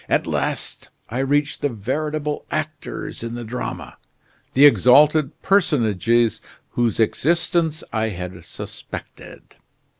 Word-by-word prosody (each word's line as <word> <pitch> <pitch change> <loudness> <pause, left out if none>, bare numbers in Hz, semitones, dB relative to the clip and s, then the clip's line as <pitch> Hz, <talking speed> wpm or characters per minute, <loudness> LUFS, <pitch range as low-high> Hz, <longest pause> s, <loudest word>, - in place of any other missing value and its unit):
At - - +2
last - - -2 0.2
I 120 - -2
reach 145 +2 +1
the 145 - 0
veritable 150 +6 -3
actors 155 -1 -4
in 115 0 -5
the 120 - -5
drama, 120 +3 -6 0.6
the 140 +3 +8
exalted 145 +2 +5
personages 120 - +2 0.3
whose 120 -3 0
existence 165 - +1
I 110 0 0
had 90 -2 -7
suspected. - - -9
135 Hz, 110 wpm, -22 LUFS, 115-150 Hz, 0.6 s, the